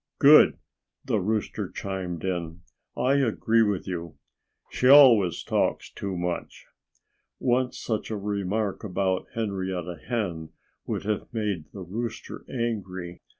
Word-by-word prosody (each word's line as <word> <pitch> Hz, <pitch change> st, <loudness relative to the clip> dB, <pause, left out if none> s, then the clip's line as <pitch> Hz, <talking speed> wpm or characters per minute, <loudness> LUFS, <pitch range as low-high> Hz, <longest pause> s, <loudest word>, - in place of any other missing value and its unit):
"Good!" 150 Hz, +2 st, +7 dB, 0.5 s
the -, -, +1 dB
rooster 105 Hz, +2 st, -2 dB
chimed 95 Hz, -4 st, -5 dB
in. 85 Hz, -2 st, -3 dB, 0.4 s
"I 135 Hz, +2 st, +3 dB
agree 115 Hz, -3 st, +2 dB
with 105 Hz, -4 st, 0 dB
you. 85 Hz, -4 st, -5 dB, 0.5 s
She 125 Hz, -, +1 dB
always 125 Hz, -, +7 dB
talks -, -, 0 dB
too 95 Hz, -2 st, -5 dB
much." 90 Hz, 0 st, -4 dB, 0.7 s
Once 125 Hz, 0 st, +1 dB
such 110 Hz, -2 st, -3 dB
a 110 Hz, -, -2 dB
remark 100 Hz, +1 st, -2 dB
about 95 Hz, -2 st, -1 dB
Henrietta 95 Hz, -6 st, -3 dB
Hen 90 Hz, -10 st, -3 dB, 0.3 s
would -, -, -2 dB
have 105 Hz, 0 st, -3 dB
made 105 Hz, -8 st, -2 dB
the 95 Hz, -, -8 dB
rooster 115 Hz, +6 st, -6 dB
angry. 95 Hz, -8 st, -4 dB
100 Hz, 120 wpm, -26 LUFS, 90-115 Hz, 0.7 s, Good